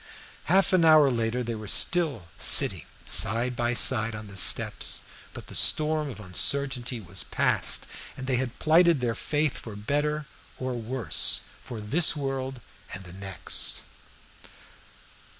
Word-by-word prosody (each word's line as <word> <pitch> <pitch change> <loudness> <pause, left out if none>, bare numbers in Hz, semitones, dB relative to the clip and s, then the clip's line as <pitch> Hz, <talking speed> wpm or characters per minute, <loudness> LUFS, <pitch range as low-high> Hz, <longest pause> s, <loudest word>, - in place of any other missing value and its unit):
Half 190 +3 +2
an 180 -2 +3
hour 155 -4 +5
later 115 +1 -3
they 120 0 -5
were 110 -1 -9
still 155 - +1
sitting - - +4 0.2
side 120 +2 +2
by 120 +1 -2
side 110 -1 +4
on 105 0 -9
the 100 -1 -13
steps, 95 - +2 0.3
but - - -11
the - - -14
storm 155 -1 +3
of 125 - -10
uncertainty 125 +5 0
was 95 -2 -8
passed, - - 0 0.3
and 130 - -8
they 130 -1 -1
had 130 -1 -5
plighted 165 0 +3
their 120 -2 -2
faith 150 +3 -2
for 110 -3 -11
better 145 +8 -2
and 150 -2 -10 0.3
for 130 0 -5
worse, 120 +1 -1 0.2
for 120 - -9
this 155 +12 +3
world 135 -3 -5 0.3
and 95 - -9
the 90 -2 -13
next. 95 -1 -3
125 Hz, 150 wpm, -25 LUFS, 110-150 Hz, 0.3 s, hour